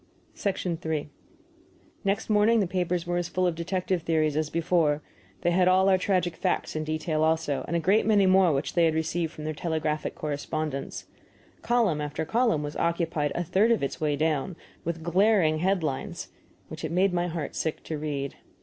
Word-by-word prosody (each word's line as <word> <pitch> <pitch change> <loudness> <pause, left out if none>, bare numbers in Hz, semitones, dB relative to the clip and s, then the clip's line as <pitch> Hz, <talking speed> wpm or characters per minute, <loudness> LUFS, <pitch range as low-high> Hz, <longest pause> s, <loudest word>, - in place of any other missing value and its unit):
III 155 -2 -2 0.9
Next 200 +1 0
morning 215 +2 +4
the 200 - +2
papers 180 -1 -1
were 175 0 -1
as 175 -1 -1
full 185 0 0
of 175 - +2
detective 180 +1 -2
theories 155 -2 +1
as 155 0 0
before; 165 -3 +1 0.4
they 175 - +2
had 180 +1 +3
all 190 +1 +5
our 190 - +5
tragic 180 -3 0
facts 185 -4 -1
in 155 - -1
detail 155 0 -1
also, 160 -4 +1
and 170 - -2
a - - +2
great 195 +7 +2
many 205 -3 +5
more 185 -2 +5
which 140 0 -1
they 170 -1 +4
had 160 -1 +2
received 160 0 -1
from 155 - -9
their 155 0 -2
telegraphic 155 -1 -2
correspondents. 150 -1 -4 0.6
Column 225 -11 +2
after 150 +1 -3
column 225 -5 +1
was 145 +1 -5
occupied, 165 -3 0
a 175 - 0
third 195 +7 +2
of 230 -9 +2
its 140 - -3
way 150 -2 +1
down, 155 +3 0 0.3
with 165 -1 -4
glaring 175 -2 +3
head 185 0 +1
lines, 140 -4 -4 0.4
which - - -9
it - - -3
made 185 +2 +2
my 175 0 0
heart 165 -3 -4
sick 160 - -2
to 160 - -4
read. 145 -2 -3
165 Hz, 185 wpm, -27 LUFS, 155-185 Hz, 0.9 s, all